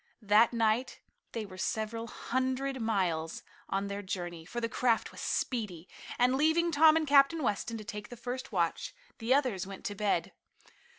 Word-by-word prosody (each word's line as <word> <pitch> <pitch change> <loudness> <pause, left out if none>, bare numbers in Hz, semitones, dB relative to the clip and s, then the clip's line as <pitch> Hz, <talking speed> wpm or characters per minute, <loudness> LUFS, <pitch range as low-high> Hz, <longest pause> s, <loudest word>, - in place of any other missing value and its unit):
That 210 +3 +5
night 230 +1 +1 0.3
they 225 -2 -4
were 185 -2 -11
several 225 +3 -2
hundred 260 +2 -2
miles 180 -7 -1 0.3
on 195 +1 0
their 200 0 -4
journey, 175 -4 -5
for 240 +8 -4
the 230 - -1
craft 230 0 +1
was - - -9
speedy, 200 -9 -2 0.3
and 250 +1 +4
leaving 320 +5 +3
Tom 310 +1 +6
and 320 -1 +2
Captain 285 +2 +5
Weston 225 +1 -1
to 215 - -7
take 205 0 -7
the 245 - -9
first 245 +2 -5
watch, 175 - -1 0.2
the 230 +2 -3
others 250 -9 +2
went 195 -1 -9
to 205 - -2
bed. 200 -4 0
225 Hz, 170 wpm, -31 LUFS, 200-260 Hz, 0.3 s, Tom